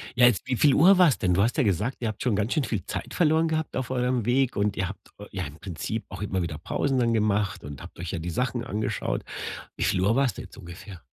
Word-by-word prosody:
Ja, 125 0 +6
jetzt 120 -1 +1
wie 130 - 0
viel 145 +3 +4
Uhr 180 +7 +6
war's 165 - +5
denn? 90 -3 +1
Du 95 - +3
hast 115 +4 +1
ja 150 - +4
gesagt, 105 +4 0
ihr 120 - -2
habt 110 -1 -5
schon 125 -5 +1
ganz 105 +4 0
schön 155 - +1
viel 105 -8 -2
Zeit - - -5
verloren 160 -1 +3
gehabt 160 -1 -2
auf 130 - -2
eurem 125 -2 0
Weg 130 +1 +2
und 100 0 0
ihr 95 - 0
habt 100 - -10
eu 105 - -8
ja 95 -1 -3
im 75 +3 -10
Prinzip 95 +4 -4
auch - - -8
immer 95 -2 -1
wieder 85 -3 -3
Pausen 135 - -1
dann 120 -1 +2
gemacht 105 -3 0
und 70 -1 -8
habt - - -12
euch 85 0 -4
ja 95 - -3
die 85 +2 -4
Sachen 120 +5 -1
angeschaut. 110 -3 -2 0.5
Wie - - -1
viel 90 - +1
Uhr 100 +5 +3
war's 135 -2 +2
denn - - -8
jetzt - - -15
ungefähr? 85 0 -10
110 Hz, 270 wpm, -26 LUFS, 95-130 Hz, 0.5 s, Ja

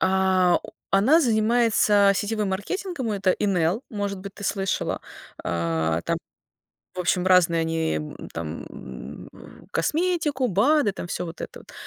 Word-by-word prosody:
А, 185 -1 +3
о - - -10 0.2
она 240 +12 +5
занимается 220 -4 +4
сетевым 210 0 -1
маркетингом, 260 - -3
это 195 -2 +2
Inel, 190 +1 +1
может 200 -2 -3
быть, 200 +1 -8
ты 205 - -8
слышала. 195 -1 -1 0.4
Э, 80 -1 0
там, - - +1 0.8
в - - -10
общем, 180 0 +1
разные 175 -3 +5
они, 160 - 0
м, 75 0 -7
там, 80 0 -5
м, 65 +2 -9
в - - -15
косметику, 300 - 0
БАДы, 230 - +3
там, 190 - -6
всё 180 - -3
вот 165 0 -8
это - - -7
вот. - - -16
195 Hz, 145 wpm, -24 LUFS, 170-225 Hz, 0.8 s, она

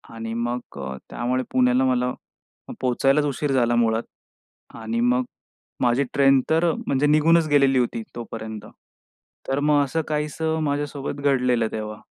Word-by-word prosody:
आणि 115 0 -5
मग 120 +1 -2 0.2
अ, 65 0 -5
त्यामुळे 125 +2 -1
पुण्याला 125 +1 +3
मला 125 -1 +1 0.6
अ, - - -5
पोहचायलाच 135 +3 +2
उशीर 145 0 -2
झाला 120 -2 +2
मुळात. 115 -1 +2 0.7
आणि 115 +1 -3
मग 125 +1 +2 0.6
माझी 125 +3 +2
ट्रेन 135 -1 +4
तर 165 +1 +3 0.2
म्हणजे 140 +2 +2
निघूनच 155 +2 +4
गेलेली 135 -2 +4
होती 115 -2 -1
तोपर्यंत. 110 -2 -7 0.8
तर 135 +1 0
मग 145 -1 +3
असं 160 +4 -1
काहीसं 155 +1 -2
माझ्यासोबत 145 -1 -3
घडलेलं 125 -5 +2
तेव्हा. 110 0 -6
130 Hz, 140 wpm, -23 LUFS, 120-145 Hz, 0.8 s, ट्रेन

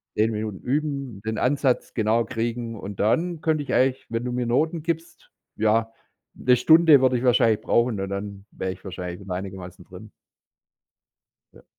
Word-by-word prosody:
10 110 +1 +2
Minuten 105 -2 -4
üben, 140 -6 -3
den 110 0 -2
Ansatz 135 -1 0
genau 115 +1 +2
kriegen 115 0 -4
und 100 0 -6
dann 165 +9 +1
könnte 155 -2 0
ich - - -4
eigentlich, 130 0 +2
wenn 115 +1 -3
du 125 - -3
mir 125 0 -1
Noten 155 +7 0
gibst 165 0 -5 0.3
ja, 110 +1 +2 0.4
'ne 125 0 +3
Stunde 160 +2 +6
würde 130 -1 +3
ich 120 - -4
wahrscheinlich 115 -3 +3
brauchen 120 -3 +1
und 95 0 -3
dann 100 0 -6
wäre 95 0 -4
ich 95 - -11
wahrscheinlich 90 -1 -6
wieder 95 -2 -6
einigermaßen 95 -1 -7
drin. - - -13 1.4
Ja. - - -19
115 Hz, 170 wpm, -24 LUFS, 105-135 Hz, 1.4 s, Stunde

